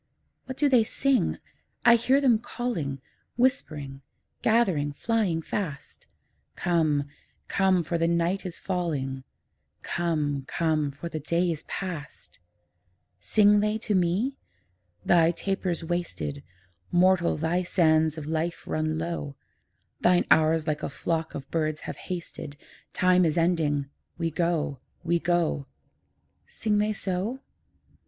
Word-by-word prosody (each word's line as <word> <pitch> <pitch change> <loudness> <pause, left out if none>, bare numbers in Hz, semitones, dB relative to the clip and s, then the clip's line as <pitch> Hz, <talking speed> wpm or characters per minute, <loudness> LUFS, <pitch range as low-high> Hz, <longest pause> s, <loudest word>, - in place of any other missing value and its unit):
What 260 0 -7
do 295 - +3
they 250 -5 +5
sing? 270 +4 +1 0.5
I 240 - +9
hear 255 +4 +4
them 250 -6 +4
calling, 195 - -3 0.4
Whispering, 150 - -1 0.4
gathering, 185 -11 +2
flying 195 -3 0
fast, 150 -9 -5 0.5
'Come, 155 -4 +1 0.4
come, 190 -3 +2
for 170 +1 -2
the 165 - +2
night 170 +3 +1
is 180 -3 -5
falling; 145 -8 -2 0.6
Come, 150 -5 -1
come, 155 -3 0
for 145 +5 -7
the 160 -2 -4
day 170 +4 +1
is 155 - -4
past!' 175 -6 -6 0.8
Sing 210 -1 +4
they 210 +1 +1
to 220 -1 -2
me? 190 +9 +1 0.7
'Thy 165 -2 +5
taper's 180 -1 -2
wasted; 165 -4 -3 0.5
Mortal, 180 0 +3
thy 165 +3 0
sands 160 -3 +2
of 155 - -5
life 160 +2 -2
run 155 0 -1
low; 160 -4 -4 0.6
Thine 180 0 +4
hours 160 0 +4
like 150 -2 -1
a - - -3
flock 160 +4 -2
of 135 -1 -6
birds 155 -2 -1
have - - -6
hasted: 170 -5 -6 0.3
Time 185 0 +4
is 160 -1 +1
ending; 160 -4 +2 0.3
we 165 -1 -1
go, 160 -4 0 0.2
we 170 0 +1
go.' 170 -5 0 0.8
Sing 210 -1 0
they 210 +1 +1
so? 205 +6 -3
170 Hz, 125 wpm, -27 LUFS, 155-190 Hz, 0.8 s, I